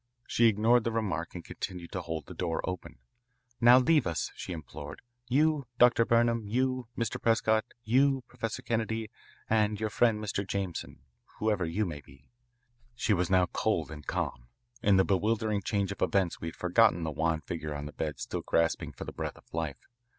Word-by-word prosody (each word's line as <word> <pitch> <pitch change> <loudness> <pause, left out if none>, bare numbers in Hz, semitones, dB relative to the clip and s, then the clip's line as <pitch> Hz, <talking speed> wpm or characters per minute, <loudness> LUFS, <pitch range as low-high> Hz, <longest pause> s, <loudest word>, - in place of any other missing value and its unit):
She 120 - +2
ignored 115 +3 +4
the 115 - -1
remark 90 -8 -2
and 85 - -7
continued 90 -2 -6
to 95 - -3
hold 80 -3 -5
the - - -9
door 85 -3 -2
open. 90 -7 -5 0.6
"Now 120 +1 +8
leave 135 - +4
us," 85 -2 -2
she - - -6
implored, 75 -3 -8 0.2
"you, 150 0 +2
Dr. 120 -1 +5
Burnham, 115 0 +3
you, 130 +2 0
Mr. 115 -3 -2
Prescott, 110 -1 +3 0.2
you, 135 +3 +3
Professor 115 -3 -5
Kennedy, 110 -1 -2 0.4
and 105 -2 +2
your 110 -1 -1
friend 115 0 +3
Mr. 105 -1 -2
Jameson, 95 -4 -4 0.4
whoever 105 -4 +1
you 105 +6 0
may 75 -5 -5
be." 70 - -20 0.6
She 115 - +1
was 90 -2 +1
now 95 -1 +4
cold 85 -8 0
and 75 -1 -9
calm. - - -3 0.3
In 100 -2 +4
the 95 - +5
bewildering 105 +1 +1
change 100 0 -1
of 100 - -7
events 95 -3 +1
we 80 - -4
had 80 - -6
forgotten 90 -1 +3
the 80 - -2
wan 80 +1 0
figure 80 -2 -5
on 70 0 -5
the 75 - -7
bed 75 -4 -3
still - - -3
gasping 85 0 0
for - - -7
the - - -7
breath - - -4
of - - -21
life. 80 -4 -3
100 Hz, 185 wpm, -30 LUFS, 85-115 Hz, 0.6 s, Now